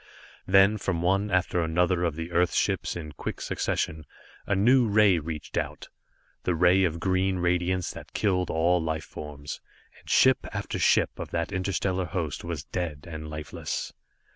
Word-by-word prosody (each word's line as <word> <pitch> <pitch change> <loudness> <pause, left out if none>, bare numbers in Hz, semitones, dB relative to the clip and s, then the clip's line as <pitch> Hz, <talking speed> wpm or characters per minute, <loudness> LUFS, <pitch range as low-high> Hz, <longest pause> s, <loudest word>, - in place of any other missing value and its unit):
Then 100 +3 +5
from 90 -4 -1
one 95 +3 +2
after 90 -2 +1
another 85 +2 +1
of 80 -3 -1
the 80 +2 -5
Earth 90 +1 +2
ships, - - 0
in 80 -3 -6
quick 70 - -6
succession, 75 -1 -2 0.4
a 100 - +2
new 120 +5 +4
ray 100 -4 +4
reached 75 -1 -6
out - - -5 0.5
the 90 - 0
ray 90 +3 +4
of 85 -1 -2
green 95 +1 +1
radiance 90 +1 0
that - - -11
killed 90 -4 +1
all 85 +2 +2
life 80 -1 -2
forms, 75 -1 -8 0.4
and - - -16
ship 130 -1 +4
after - - -3
ship - - +3
of - - -5
that - - -2
interstellar 95 0 -1
host 85 -4 -3
was 85 -4 -4
dead 80 -5 -4
and 80 -2 -7
lifeless. 75 -1 -5
90 Hz, 165 wpm, -27 LUFS, 80-95 Hz, 0.5 s, Then